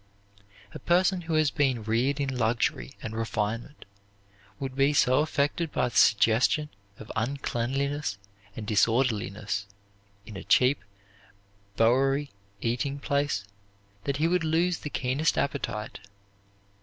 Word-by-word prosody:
A - - -7
person 180 +1 +2
who 165 -1 -2
has 155 -2 +3
been 135 -7 +1
reared 120 +6 0
in 135 -2 -1
luxury 120 +3 0
and 110 - -5
refinement 115 +4 -3 0.7
would 135 -2 -4
be 140 +2 +3
so 130 -2 +4
affected 150 +2 0
by 125 - 0
the - - -14
suggestion 115 +8 +4 0.3
of 110 - -10
uncleanliness 135 0 -2 0.4
and 110 - -6
disorderliness 105 -3 0 0.6
in 105 - -10
a 95 - -7
cheap 130 -3 +3 0.9
Bowery 135 +5 +2 0.3
eating 125 +4 -1
place 140 -7 -1 0.6
that 140 -1 -1
he 155 +3 +2
would 180 0 +1
lose 165 +2 +1
the 150 - -6
keenest 135 +4 0
appetite. 135 -6 -2
135 Hz, 120 wpm, -27 LUFS, 115-145 Hz, 0.9 s, so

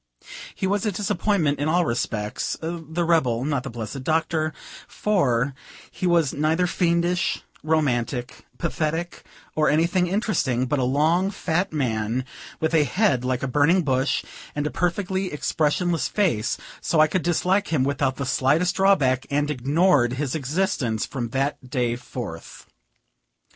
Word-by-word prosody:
He - - -2
was 200 +1 0
a 215 - +1
disappointment 195 -6 0
in 145 - 0
all 175 +2 +3
respects, 110 -4 -2
(the 165 0 -3
rebel, 130 -8 +2
not 145 -3 0
the 135 - -6
blessed 115 +2 -6
Doctor,) 160 +1 0 0.4
for 140 - +1 0.4
he 185 - -2
was 170 -5 +3
neither 160 +4 +1
fiendish, 175 0 +1 0.2
romantic, 135 -5 -1
pathetic, 165 0 -2 0.3
or 155 -1 +3
anything 170 +4 +2
interesting; 170 - 0
but 140 +2 0
a - - +1
long, 155 +9 +2
fat 180 -2 -1
man, 120 -4 -1 0.3
with 160 +1 0
a 160 -2 +5
head 165 - +1
like 130 0 -1
a - - 0
burning 150 +8 +3
bush, 130 -1 +1 0.3
and 145 0 -1
a 150 - -1
perfectly 185 +1 -1
expressionless 160 +3 0
face: 160 - 0 0.2
so 160 - +1
I 155 - +8
could 165 +3 -1
hate 185 +3 +1
him 150 -5 +2
without 135 -1 0
the 140 - -3
slightest 145 +8 +2
drawback, 150 -10 +3
and 145 +1 0
ignored 145 -1 +2
his 135 0 -2
existence 140 - -1
from 120 -4 -4
that 135 0 -2
day 125 -3 0
forth. 120 -8 -8
150 Hz, 145 wpm, -24 LUFS, 130-175 Hz, 0.4 s, I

